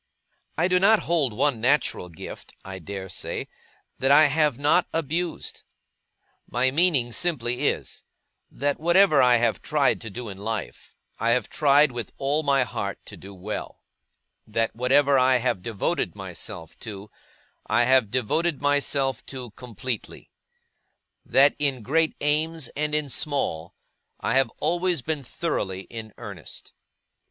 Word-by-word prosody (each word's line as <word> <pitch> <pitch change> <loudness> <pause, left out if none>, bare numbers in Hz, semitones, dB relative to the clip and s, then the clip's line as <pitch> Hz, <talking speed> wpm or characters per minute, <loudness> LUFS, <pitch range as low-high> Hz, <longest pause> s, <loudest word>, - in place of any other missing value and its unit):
I 175 - +3
do 180 0 +3
not 215 +3 +5
hold 160 -7 +1
one 115 +2 0
natural 125 -8 +1
gift, 80 - -10
I 95 -1 -7
dare 95 +2 -7
say, 90 - -4 0.5
that 135 - +1
I 145 +2 +8
have 150 -3 +2
not 150 +5 +3
abused. 165 +2 -3 0.9
My 130 +2 +1
meaning 145 -6 +2
simply 125 -4 0
is, - - -3 0.5
that 145 +1 -2
whatever 170 -2 +5
I 125 -1 +6
have 115 -1 +1
tried 145 -3 +1
to 115 - -6
do 120 +4 -7
in 95 -2 -8
life, 110 +1 -5 0.2
I 115 +1 +2
have 125 - -1
tried 145 -1 +4
with 120 -1 -6
all 140 +3 +1
my 140 -3 +3
heart 120 - -4
to - - -9
do 100 0 -11
well; 100 +4 -6 0.6
that 115 +1 -1
whatever 135 +3 +3
I 130 0 +4
have 120 -5 -1
devoted 110 -1 -1
myself 80 0 -8
to, 105 -1 -8 0.6
I 110 +3 +3
have 130 -3 +4
devoted 135 +7 0
myself 140 -3 0
to 125 -4 -7
completely; 125 0 -6 0.9
that 140 +2 +4
in 135 -5 0
great 160 +6 +1
aims 155 +1 0
and 150 +1 -2
in 150 -3 -1
small, 115 - -2 0.4
I - - -1
have 135 -2 +3
always 175 -4 +1
been 150 0 -3
thoroughly 100 - -3
in 110 +1 -9
earnest. - - -9
135 Hz, 145 wpm, -25 LUFS, 115-150 Hz, 0.9 s, I